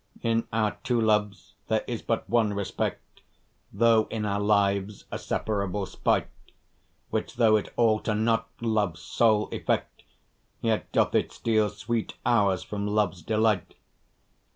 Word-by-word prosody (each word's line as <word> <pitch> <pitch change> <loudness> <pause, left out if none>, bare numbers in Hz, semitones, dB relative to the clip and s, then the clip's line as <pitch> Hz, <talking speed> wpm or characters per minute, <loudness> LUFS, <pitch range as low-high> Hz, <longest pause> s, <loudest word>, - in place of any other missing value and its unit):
In 115 0 +1
our 105 -2 0
two 120 -2 +1
loves 105 -2 0
there 110 -1 +1
is 120 -2 -4
but 115 - -2
one 115 -3 +2
respect, 100 -1 -4 0.5
Though 115 -2 +4
in 110 -1 -3
our 100 -1 0
lives 100 -1 +1
a - - -3
separable 100 -2 -2
spite, - - 0 0.8
Which - - -2
though 115 -3 +5
it 105 - -1
alter 110 -2 +2
not 115 +1 +1
love's 105 -7 0
sole 110 -2 +2
effect, - - -2 0.6
Yet 115 -2 -1
doth - - +2
it - - +1
steal 110 -2 +1
sweet 110 +2 -3
hours 100 -6 +2
from 105 -1 -4
love's 105 -4 0
delight. 110 0 0
110 Hz, 135 wpm, -27 LUFS, 100-115 Hz, 0.8 s, though